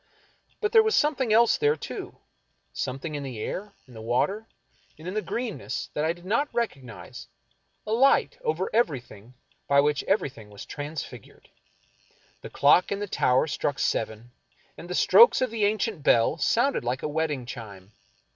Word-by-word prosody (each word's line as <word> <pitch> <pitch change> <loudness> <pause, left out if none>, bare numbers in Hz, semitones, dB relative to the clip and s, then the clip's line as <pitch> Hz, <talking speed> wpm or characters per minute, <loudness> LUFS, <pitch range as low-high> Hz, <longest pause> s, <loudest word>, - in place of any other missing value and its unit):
But 420 0 0
there 455 - +7
was 440 0 +1
something 275 -6 +1
else 230 +1 +4
there, 445 0 +3
too - - -8 0.3
— - - -46
something 145 +5 -4
in 145 - -4
the 130 -5 -6
air, 200 - -5
in 125 - -16
the 110 - -9
water, 190 - -1 0.5
and 155 +3 -11
in 185 - -4
the 215 - -1
greenness 235 -1 -4
that 150 - -1
I 160 - +2
did 175 +1 -10
not 260 +10 0
recognize 130 - -5 0.3
— 65 0 -46
a 215 - -5
light 275 - +3
over 455 -2 -1
everything 130 - -2 0.3
by 140 0 +4
which 145 0 +2
everything 130 - -1
was 100 -1 -10
transfigured. 145 -5 -8 0.9
The - - -8
clock 145 +6 +4
in 200 - 0
the 205 - -3
tower 130 -9 +2
struck 145 -2 -2
seven, 110 -1 -2 0.4
and 175 - -11
the 180 - -3
strokes 470 - +6
of 255 -3 0
the 220 -3 0
ancient 210 -3 -1
bell 130 +4 +3
sounded 240 - +1
like 125 +2 -3
a - - 0
wedding 150 -4 -2
chime. 105 -6 -10
160 Hz, 175 wpm, -26 LUFS, -, 0.9 s, there